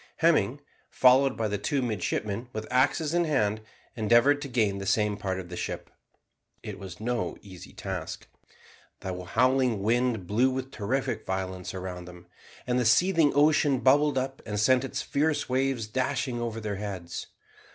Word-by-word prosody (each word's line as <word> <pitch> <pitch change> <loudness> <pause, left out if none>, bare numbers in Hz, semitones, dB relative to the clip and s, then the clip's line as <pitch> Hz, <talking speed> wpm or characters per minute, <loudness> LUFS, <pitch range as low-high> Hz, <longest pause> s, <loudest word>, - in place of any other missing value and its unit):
Hemming, 145 -5 +2 0.3
followed 130 +1 +4
by 110 - 0
the 105 -1 -2
two 135 +5 0
midshipmen 110 0 -2
with 110 0 -4
axes 145 +5 +2
in 175 0 +2
hand, 110 -8 +1 0.3
endeavoured 120 +6 +4
to 140 - -4
gain 110 -6 0
the 95 - -5
same 105 0 +2
part 95 -2 -3
of 90 -2 -8
the 90 - -6
ship. - - -5 0.7
It 100 -3 -7
was 95 -2 -9
no 120 +2 -2
easy 95 -4 -11
task. - - -6 0.8
The 90 -1 -5
howling 125 +1 +2
wind 115 -2 +1
blew 115 +8 +2
with 130 0 -4
terrific 125 +5 -2
violence 95 -1 -4
around 90 -1 -6
them, 90 0 -12 0.4
and 125 0 +1
the - - +2
seething 165 - +4
ocean 145 -2 +4
bubbled 145 +2 +4
up, 135 +1 -2
and 105 -1 -3
sent 130 +4 +4
its 135 - -3
fierce 150 +1 0
waves 130 -2 0
dashing 130 +1 -2
over 115 -1 -3
their 105 -3 -4
heads. 95 -4 -6
120 Hz, 160 wpm, -27 LUFS, 100-135 Hz, 0.8 s, followed